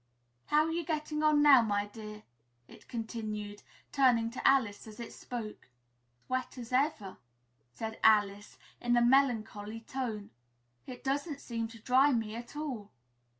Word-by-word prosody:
How 300 +1 +4
are 320 - -2
you 340 +1 -1
getting 305 -1 -2
on 305 -1 +4
now, 280 -4 +8
my 205 -2 0
dear?" 210 0 -10 0.4
it - - -16
continued, 215 -3 -5 0.3
turning 245 -5 +3
to 255 - -1
Alice 230 -7 +2
as 215 +2 -11
it 235 - -7
spoke. 225 - -7 0.6
"As - - -40
wet 255 0 -2
as 240 0 -8
ever," 255 -8 0 0.5
said 220 - -6
Alice 205 -2 +3 0.2
in 240 0 +2
a - - +4
melancholy 225 -4 +1
tone; 225 -4 -5 0.6
"it 250 -1 -9
doesn't 280 +2 -2
seem 230 -3 -4
to 230 0 -13
dry 265 +5 +4
me 220 -3 -1
at 235 +3 -9
all." 260 -9 -5
235 Hz, 150 wpm, -31 LUFS, 215-270 Hz, 0.6 s, now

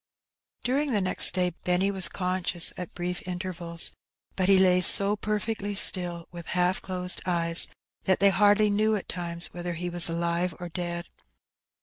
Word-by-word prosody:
'' - - -41
During 275 +2 0
the 210 - +3
next 185 0 +2
day 180 -1 +1
Benny 180 +2 +1
was 190 -2 +2
conscious 180 -2 0
at 180 -2 -8
brief 180 0 -4
inter 185 +1 -5
vals, 170 -1 -4 0.4
but 185 0 0
he 195 - +6
lay 180 -1 +4
so 200 +3 +5
perfectly 210 0 -3
still, 175 -3 +2
with 170 -1 -10
half 180 +1 +1
closed 180 -1 -3
eyes, 170 -1 +3 0.4
that 190 - +2
they 200 0 +5
hardly 205 +1 +4
knew 215 +1 +2
at 200 - -5
times 170 -1 -5
whether 175 0 -4
he 175 +1 -5
was 175 -1 +3
alive 170 +1 -1
or 175 -1 -6
dead. 175 0 -4
180 Hz, 170 wpm, -26 LUFS, 175-195 Hz, 0.4 s, he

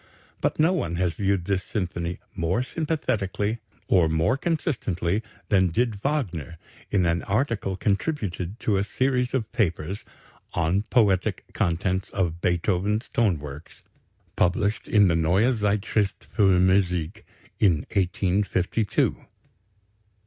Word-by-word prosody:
But - - 0
no 165 +4 +4
one 120 - -1
has 90 -1 0
viewed 100 -2 0
this 95 -1 0
symphony 85 -3 -3 0.2
more 90 +8 0
sympathetically 115 - -1 0.3
or 85 -4 +4
more 80 +8 +2
consistently 115 - -1 0.3
than 95 -2 +4
did 115 +7 +1
Wagner 90 - -2 0.3
in 95 -3 +2
an 85 +1 +1
article 105 -4 -1
contributed 100 - -2
to 105 -3 +1
a 95 - +1
series 125 +3 0
of 110 -5 -2
papers 95 -4 -1 0.5
"On 85 +3 +2
the - - -3
poetic 100 -7 +2
contents 95 +3 0
of 85 -3 -2
Beethoven's 95 +5 0
tone 105 -8 +2
works," 75 +2 -10 0.5
published 100 +4 +1
in 105 -2 +5
the 85 - +2
Neue 90 +10 +3
Zeitschrift 105 -1 0
für 95 -3 +4
Musik, 90 +1 +1 0.4
in 85 -8 +4
1852. 95 +2 0
95 Hz, 120 wpm, -25 LUFS, 90-110 Hz, 0.5 s, in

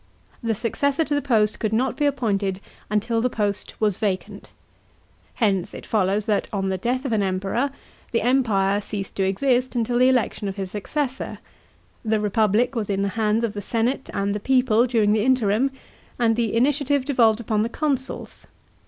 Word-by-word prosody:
The 230 -1 0
successor 280 +8 0
to 300 - -2
the 290 - +1
post 215 -6 +1
could 215 - -1
not 250 +4 +1
be 295 - 0
appointed 205 -8 -1 0.3
until 225 +2 0
the 250 - +1
post 205 -4 -2
was 210 -4 +1
vacant. 200 -1 -3 0.9
Hence 195 -4 0
it - - -9
follows 200 -1 +1
that, 210 -2 0
on 195 -2 -1
the 190 - -1
death 255 +6 -1
of 265 - -1
an 220 -2 +2
Emperor, 195 +7 0 0.4
the 230 - +1
Empire 210 -6 +2
ceased 200 -1 -5
to 195 - +2
exist 250 +6 +1
until 240 +1 +1
the 255 +1 +6
election 245 -5 0
of 195 - -4
his 190 -2 -5
successor; 265 +6 -3 0.7
the 220 -1 +1
republic 215 +4 +2
was 225 -5 -3
in 195 0 0
the 200 - 0
hands 220 +2 0
of 225 -3 -1
the 205 - -5
senate 235 +6 -1
and 200 0 -1
the 205 - -2
people 250 0 +3
during 220 -4 +2
the 215 -1 +2
interim, 250 0 +2 0.5
and 230 -2 +2
the 230 -2 0
initiative 280 +2 +2
devolved 235 -6 +3
upon 215 -2 0
the 225 - 0
consuls. 275 -1 -3
225 Hz, 180 wpm, -23 LUFS, 205-250 Hz, 0.9 s, the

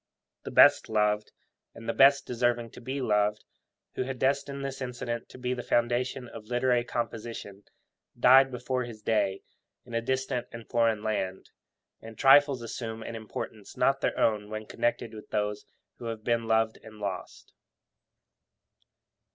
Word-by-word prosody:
The - - -4
best - - +6
loved, 105 -1 +1 0.4
and 115 - -10
the - - 0
best 140 +1 +6
deserving 120 -1 0
to - - -12
be 135 +3 -4
loved, 105 -2 +1 0.5
who - - -3
had 130 0 -3
destined 140 +1 0
this 135 0 -5
incident 120 -2 -4
to - - -12
be 125 0 -2
the 125 - -4
foundation 120 +2 0
of 110 -2 -11
literary 125 0 +2
composition, 115 -4 -5 0.5
died 130 +2 +7
'before 125 0 -2
his 110 -3 -10
day' 100 -3 0 0.4
in 120 - -12
a 115 - +1
distant 130 0 -1
and 115 -1 -9
foreign 115 -2 +1
land; 95 -3 -3 0.5
and 110 -1 -11
trifles 135 -2 +6
assume 115 -1 -5
an 115 - -6
importance 110 -1 -7
not - - +2
their - - 0
own 105 -2 +1
when 110 0 -5
connected 115 0 -2
with 110 - -11
those 105 -1 -2 0.3
who 120 - -8
have 115 -2 -5
been 115 -1 0
loved 110 0 +2
and 110 -1 -13
lost. 100 -3 -6
115 Hz, 155 wpm, -28 LUFS, 110-125 Hz, 0.5 s, died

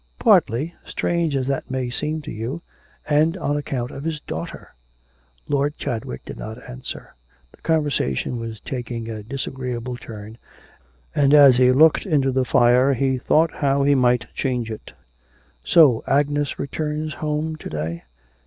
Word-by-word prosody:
'Partly, 145 +10 +3
strange 170 -4 -1
as 130 -1 0
that 135 0 -2
may 130 -1 -2
seem 155 +4 -3
to - - -7
you, 115 +9 -4 0.5
and 155 +3 +2
on 145 - -1
account 130 -4 -3
of 135 - -8
his 160 -1 -2
daughter.' 80 - -7 0.7
Lord 145 +1 0
Chadwick 110 - -4
did - - -8
not 110 +1 -6
answer. 125 +1 -8 0.4
The - - -22
conversation 145 - 0
was 115 -2 -6
taking 120 -3 -5
a 110 -1 -6
disagreeable 125 0 -5
turn, 110 -1 -10 0.7
and 145 0 +4
as 140 -4 +8
he 125 0 +5
looked 155 +8 +4
into 140 -6 +2
the 130 0 +1
fire 125 +3 +4
he 130 0 0
thought 155 +5 +3
how 140 -1 +1
he 140 +1 +4
might 125 -2 +3
change 125 -4 -2
it. 110 - -8 0.7
'So 125 - +5
Agnes 145 +1 +1
returns 150 +2 -3
home 155 +1 -2
to - - -8
day?' 80 +2 -4
135 Hz, 150 wpm, -22 LUFS, 120-150 Hz, 0.7 s, as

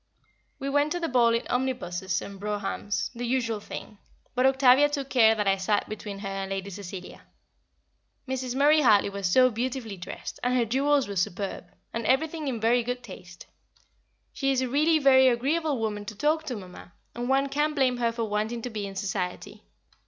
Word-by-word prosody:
We 275 - -5
went 290 +2 +1
to 350 - -2
the 335 - -1
ball 235 -4 +3
in 230 - -2
omnibuses 190 -8 -2
and 200 -1 -9
broughams, 205 -2 -3
the 240 0 -6
usual 235 -3 0
thing; 205 0 -9 0.3
but 255 +1 +3
Octavia 265 +1 +5
took 280 -2 -4
care 225 -3 +5
that 210 -2 -1
I 195 0 +3
sat 205 +2 0
between 210 -1 -6
her 195 0 -6
and 195 0 -4
Lady 195 0 -4
Cecilia. 190 -1 -8 1.1
Mrs. 260 -1 -3
Murray 295 +3 +5
Hartley 210 -6 +4
was 200 -2 -2
so 255 +4 +5
beautifully 235 -2 -3
dressed, 175 - -8
and 250 +1 +1
her 240 - +2
jewels 275 +3 +2
were 200 - -5
superb, 190 +2 -2 0.3
and 230 - -3
everything 310 +3 +1
in 245 -4 -2
very 235 +2 +3
good 245 +1 -4
taste. 180 -4 -11 0.9
She 275 -1 0
is 260 -1 +1
really 305 +6 +3
a - - -3
very 265 -1 +6
agreeable 280 +5 +1
woman 210 -2 -3
to 215 - -7
talk 310 +7 +1
to, 250 - -3
Mamma, 180 -3 -11 0.2
and 240 +1 -4
one 270 +1 +3
can't 295 +2 0
blame 260 -3 +2
her 235 -1 +1
for 230 0 -3
wanting 220 +2 -2
to 250 - -4
be 210 -2 -4
in 195 - -9
Society. 190 -3 -4
240 Hz, 190 wpm, -27 LUFS, 205-265 Hz, 1.1 s, very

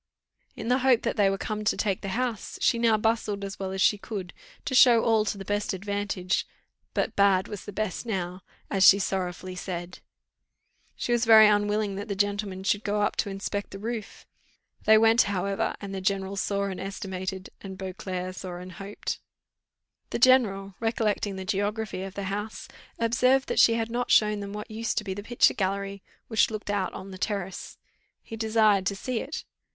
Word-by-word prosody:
In - - -6
the 250 +2 +3
hope 255 -3 +3
that 230 - -1
they 205 -3 +4
were 195 - -1
come 215 +1 -4
to 210 - +1
take 200 -3 0
the 195 - -5
house, 245 -4 -3
she 235 - +2
now 230 -2 +4
bustled 215 -2 0
as 195 -1 -6
well 190 -1 -3
as 190 0 0
she 210 - +4
could, 195 -4 -6 0.3
to - - -3
show 245 -3 +7
all 220 -2 +3
to 210 - -2
the 195 - -8
best 205 +1 -1
advantage, 195 -1 -2 0.5
but - - 0
bad 195 -2 +4
was 205 -3 -7
the - - -6
best 210 -2 -3
now, 185 -3 -3 0.3
as 195 -1 +2
she 195 - +9
sorrowfully 185 -1 -3
said. 180 -1 -6 1.0
She - - -3
was 240 0 +2
very 220 -1 +9
unwilling 205 -1 +1
that 205 +2 -5
the 200 - -3
gentlemen 200 -1 -1
should 205 +1 +1
go 205 0 0
up - - 0
to 205 - 0
inspect 200 +1 -4
the 195 - -8
roof. 220 +1 -6 0.6
They 220 0 +7
went, 225 +2 +5
however; 195 0 -1
and 200 -1 -7
the 190 - -4
general 195 0 -1
saw 200 0 -1
and 190 -2 -3
estimated, 190 -1 -5
and 190 -1 -8
Beauclerc 185 -1 -5
saw 185 -2 -6
and 180 +1 -8
hoped. 195 +3 -5 0.9
The - - -2
general, 215 -6 +4
recollecting 215 -3 0
the 190 0 -6
geography 205 0 -2
of 195 0 -7
the 200 - -4
house, 205 +3 -4 0.3
observed 250 +3 +2
that - - +1
she 230 - +6
had 225 0 -2
not 245 +1 -2
shown 210 -1 +4
them 200 0 -6
what 210 +1 -7
used 225 +1 -2
to - - +1
be 195 -2 -3
the 205 - -6
picture 240 +3 +3
gallery, 200 0 -2 0.3
which 220 -2 +3
looked 215 -2 -4
out 195 -2 -1
on 195 +1 -8
the 185 - -9
terrace; 195 -3 -4 0.5
he 225 - -8
desired 215 -3 +3
to 200 - 0
see 240 +4 -3
it. 285 +6 -6
205 Hz, 195 wpm, -27 LUFS, 190-220 Hz, 1.0 s, she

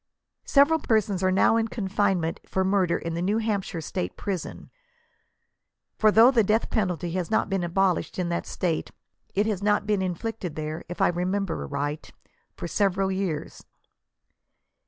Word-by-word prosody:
Several 295 +3 +5
persons 215 -7 +1
are 185 - +3
now 195 +4 +4
in 225 0 +1
confinement 190 -6 -1
for 190 - 0
murder 190 -2 +2
in 165 - -5
the 170 - -2
New 200 +4 +1
Hampshire 200 -6 -2
&tate 90 - -4
prison; 190 -4 -5 1.2
for 215 - +4
though 230 +4 +7
the 235 -4 +4
death, 215 +3 +1
penalty 180 -5 -1
has 180 -1 -2
not 220 -2 +1
been 195 -1 +1
abo 180 +1 +2
lished - - -9
in 180 -2 -1
that 170 - -2
State, 170 -3 -2 0.5
it 205 +2 +2
has 210 -3 -1
not 205 0 +2
been 205 -2 +1
inflicted 185 -1 -4
there, 155 +1 -4
if 175 - -5
I - - +5
remember 180 +1 -1
aright, 145 +1 -4 0.4
for - - -5
several 195 +1 +1
years. 190 -6 -3
190 Hz, 160 wpm, -26 LUFS, 175-210 Hz, 1.2 s, though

